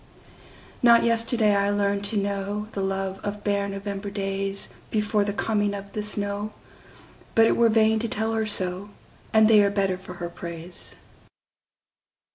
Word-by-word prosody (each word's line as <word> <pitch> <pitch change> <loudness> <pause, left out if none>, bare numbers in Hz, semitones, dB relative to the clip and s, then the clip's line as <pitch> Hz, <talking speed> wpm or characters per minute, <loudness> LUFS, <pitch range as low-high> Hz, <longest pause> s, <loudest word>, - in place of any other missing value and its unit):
Not 235 -1 +6
yesterday 230 -2 +2
I 200 0 +2
learned 200 0 0
to 210 +1 0
knowThe 200 +1 -3
love 195 0 -2
of 205 0 -4
bare 200 -1 0
November 200 0 -5
daysBefore 200 +2 -2
the 205 - -1
coming 205 0 0
of 200 0 -8
the 210 - -3
snow, 205 0 -2 0.8
But 225 - +7
it - - +3
were 235 -1 +4
vain 220 0 +4
to 235 - -1
tell 220 +1 -1
her 220 -1 0
so, 190 0 -3 0.4
And 220 0 +6
they 215 -2 +7
are 200 - +4
better 195 -2 0
for 185 -1 -10
her 175 0 -5
praise. 170 0 -7
205 Hz, 150 wpm, -25 LUFS, 195-215 Hz, 0.8 s, But